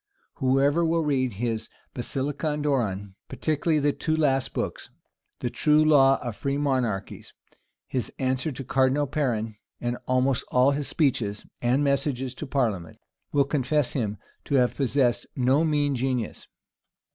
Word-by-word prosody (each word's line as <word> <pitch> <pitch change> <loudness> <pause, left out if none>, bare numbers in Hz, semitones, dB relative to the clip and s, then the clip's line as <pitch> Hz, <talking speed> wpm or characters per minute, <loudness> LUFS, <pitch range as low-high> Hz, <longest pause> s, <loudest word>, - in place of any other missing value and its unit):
Whoever 140 +4 +3
will 165 0 +2
read 130 -5 +1
his 110 +1 -3 0.2
Basilicon 145 +4 -2
Doron, 100 -9 -1
particularly 155 +1 0
the 145 -1 +2
two 155 - -1
last 135 -4 +1
books, - - -4 0.5
the 120 - -1
true 155 0 +3
law 135 -3 +5
of 120 -4 -4
free 140 +4 -2
monarchies, 130 -8 -2 0.5
his 130 -2 -3
answer 130 +3 0
to 135 0 -6
Cardinal 135 +3 +2
Perron, 120 -7 -1 0.2
and 120 0 -2
almost 130 +1 +2
all 125 +2 +4
his 140 -1 -2
speeches 120 -10 0 0.2
and 125 +4 +2
messages 135 -2 0
to 150 - -7
parliament, 110 - -1 0.3
will 145 -1 +4
confess 140 0 0
him 105 -5 -2 0.3
to 140 - 0
have 125 -2 +3
possessed 130 -2 +1
no 130 +4 +3
mean 145 -3 +1
genius. 125 -3 -2
135 Hz, 140 wpm, -26 LUFS, 125-145 Hz, 0.5 s, law